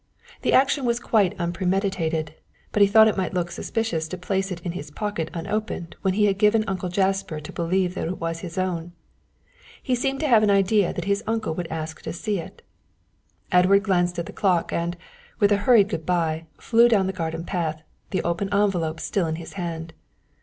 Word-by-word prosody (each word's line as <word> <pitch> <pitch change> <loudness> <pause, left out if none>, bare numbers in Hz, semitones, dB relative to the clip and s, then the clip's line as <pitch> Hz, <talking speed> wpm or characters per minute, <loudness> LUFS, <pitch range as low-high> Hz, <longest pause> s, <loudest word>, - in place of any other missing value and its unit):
The - - +1
action 275 +1 +4
was 235 0 +1
quite 205 -7 +1
unpremeditated, 175 -3 -1 0.4
but 210 - +1
he 200 - +8
thought 220 +2 +7
it 215 - +1
might 185 -1 -2
look 175 -1 -1
suspicious 175 -4 -2
to 185 - -6
place 190 +2 -2
it 175 - -4
in 175 - -3
his 150 -4 -7
pocket 170 -1 -3
unopened 180 0 -4
when 190 -1 +1
he 210 0 +4
had 200 -1 +1
given 215 +1 +4
Uncle 185 -2 -2
Jasper 190 -3 0
to 150 - -9
believe 180 +2 0
it 185 0 -3
was 165 0 -3
his 170 -1 -8
own. 175 -2 -2 0.9
He 255 - 0
seemed 270 +2 0
to 310 - +1
have 230 -5 +6
an 210 - +3
idea 200 -1 +3
that 175 - -5
his 200 0 0
uncle 220 -6 -1
would 175 +1 -4
ask 160 -1 -5
to - - -5
see 200 +3 -2
it. 165 - -10 0.9
Edward 190 +2 +5
glanced 180 -3 +1
at 170 - -2
the - - -9
clock, 180 -5 +1
and, 170 +1 -2 0.4
with 205 -2 +3
a 205 - +5
hurried 210 -5 +6
good 165 -6 -3
bye, 165 -2 -1
flew 235 +1 +4
down 205 -5 +3
the 190 - -2
garden 165 -2 -3
path, 165 -4 -3 0.3
the 185 - -1
open 170 +4 -1
envelope 180 -6 +1
still 185 -5 -1
in 160 - -2
his 165 0 -9
hand. 165 -3 -5
185 Hz, 200 wpm, -24 LUFS, 170-205 Hz, 0.9 s, he